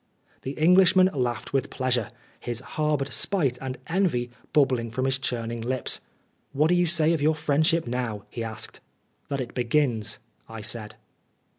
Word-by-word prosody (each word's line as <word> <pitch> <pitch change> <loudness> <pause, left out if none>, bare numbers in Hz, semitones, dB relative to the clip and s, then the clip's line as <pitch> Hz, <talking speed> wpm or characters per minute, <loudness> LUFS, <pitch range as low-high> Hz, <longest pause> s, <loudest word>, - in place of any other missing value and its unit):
The 135 - -4
Englishman 185 +4 +5
laughed 125 -4 -2
with 135 0 +1
pleasure, 125 -4 0 0.3
his 120 -2 -3
harboured 140 0 -1
spite 140 -11 +1
and 130 -1 -4
envy 160 -9 0 0.2
bubbling 130 -5 +2
from 130 +4 -2
his 135 0 +1
churning 115 -3 -2
lips. 125 +2 -1 0.5
"What 150 +3 +3
do - - +4
you 175 0 +3
say 160 -1 +3
of 160 - -1
your 155 +2 +3
friendship 160 +2 +2
now?" 120 -4 -3
he 115 - -4
asked. 110 -1 -6 0.2
" - - -43
That 140 -1 -2
it 120 - -6
begins," 120 -3 +1 0.3
I 115 -1 -7
said. 110 0 -4
130 Hz, 160 wpm, -26 LUFS, 120-155 Hz, 0.5 s, Englishman